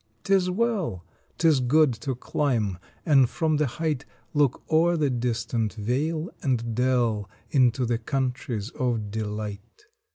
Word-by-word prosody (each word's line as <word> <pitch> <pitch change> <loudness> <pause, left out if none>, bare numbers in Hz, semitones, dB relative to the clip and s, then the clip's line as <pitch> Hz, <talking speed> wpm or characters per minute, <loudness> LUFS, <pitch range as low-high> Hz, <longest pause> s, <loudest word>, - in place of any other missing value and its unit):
Tis 190 -1 +3
well 190 - -1 0.2
* - - -39
Tis 160 -4 +4
good 135 +2 +4
to 125 +4 -4
climb 115 - -1 0.3
and 135 -6 +5
from 160 -3 0
the 150 -1 +2
height 150 +1 -2 0.3
Look 145 -4 +2
o 160 +2 +4
er 175 0 +2
the 145 -3 +1
distant 115 -2 -1
vale 150 - -1
and 120 -4 0
dell 120 -4 +1 0.2
Into 125 -2 +3
the 115 -1 0
countries 125 -3 -2
of 115 -5 -2
Delight. 105 - -5
125 Hz, 140 wpm, -26 LUFS, 115-155 Hz, 0.3 s, and